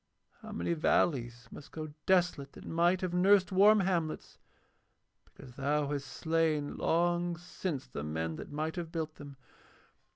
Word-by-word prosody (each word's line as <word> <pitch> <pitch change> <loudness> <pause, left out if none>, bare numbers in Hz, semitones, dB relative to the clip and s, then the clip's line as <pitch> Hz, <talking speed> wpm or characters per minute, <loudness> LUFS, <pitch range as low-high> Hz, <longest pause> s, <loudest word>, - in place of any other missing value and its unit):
How 220 -1 -9
many 205 -5 -1
valleys 120 -7 +1
must 145 - -11
go 155 -2 -6
desolate 180 -7 +2
that - - -12
might 175 +2 +2
have 185 -2 -2
nursed 190 +1 +4
warm 205 +2 +6
hamlets, 170 -4 -2 0.9
because 125 -2 -14
thou 145 +1 0
hast 140 -1 -3
slain 160 -3 0
long 175 +1 +1
since 175 -4 -5
the 70 - -6
men 80 +1 -3
that - - -8
might 155 +3 -3
have 170 -2 -4
built 160 -2 -4
them? 140 -2 -10
160 Hz, 150 wpm, -32 LUFS, 145-180 Hz, 0.9 s, warm